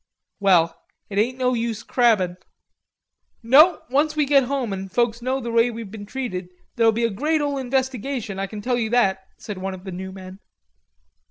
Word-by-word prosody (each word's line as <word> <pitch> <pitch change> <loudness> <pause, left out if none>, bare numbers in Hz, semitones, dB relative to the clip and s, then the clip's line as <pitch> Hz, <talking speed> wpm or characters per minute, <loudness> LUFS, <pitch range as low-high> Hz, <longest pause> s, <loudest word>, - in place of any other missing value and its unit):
"Well, 170 -4 +3 0.3
it 200 - 0
ain't 245 +4 +1
no 255 -1 +1
use 230 -2 -2
crabbin'." 210 -8 +2 1.1
"No, 305 +8 +6
onct 300 +2 +2
we 300 -1 +2
git 275 -2 +4
home 255 -5 -2
an' 195 0 -5
folks 235 +2 0
know 260 +2 -1
the 235 -2 -5
way 230 +1 +4
we've 225 -4 -7
been 205 -2 -9
treated, 200 -8 -4 0.3
there'll 230 -1 +4
be 230 +2 -2
a 230 - 0
great 305 +10 0
ole 285 -2 -1
investigation. 260 -4 -2
I 195 - -2
can 205 0 -8
tell 245 +1 0
you 220 -2 -1
that," 195 -5 +2 0.2
said 205 -3 -7
one 190 0 -4
of 185 - -13
the 190 - -7
new 190 +1 -6
men. 190 0 -10
230 Hz, 190 wpm, -23 LUFS, 195-260 Hz, 1.1 s, No